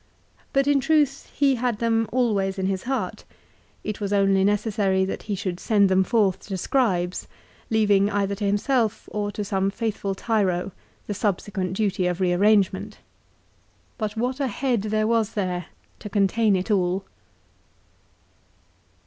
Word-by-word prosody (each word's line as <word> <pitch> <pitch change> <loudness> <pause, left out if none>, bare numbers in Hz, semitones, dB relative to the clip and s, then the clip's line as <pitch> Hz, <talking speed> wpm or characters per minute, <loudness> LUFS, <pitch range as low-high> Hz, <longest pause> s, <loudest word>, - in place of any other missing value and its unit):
But 275 -1 +2
in 285 -1 +3
truth 285 -1 +1
he 275 -3 +3
had 245 -4 0
them 225 -1 +1
always 205 -6 +1
in 190 - -1
his 190 -1 -2
heart. 265 +1 -3 0.6
It 215 0 -4
was 200 -1 -2
only 195 -1 +3
necessary 200 -2 +1
that 190 - -4
he 205 - 0
should 185 -2 -4
send 200 -2 +3
them 190 0 +4
forth 200 -3 +2
to 195 -2 -3
scribes, 185 -6 0 0.4
leaving 205 -2 +3
either 200 -1 0
to 205 - -5
himself, 220 +2 0
or 205 -1 -2
to 210 - -4
some 195 -1 0
faithful 205 -2 -3
Tiro, 195 -4 0 0.3
the 205 - -3
subsequent 195 -2 -2
duty 195 -3 0
of 180 0 -2
rearrangement. 195 +2 +2 1.0
But 215 0 -3
what 250 +4 -1
a 275 - +1
head 245 -1 0
there 215 +1 0
was 225 -1 +1
there 180 -4 -2 0.3
to 210 - -7
contain 205 +1 +2
it 185 +3 -2
all 190 -1 +1
205 Hz, 150 wpm, -24 LUFS, 190-225 Hz, 1.0 s, them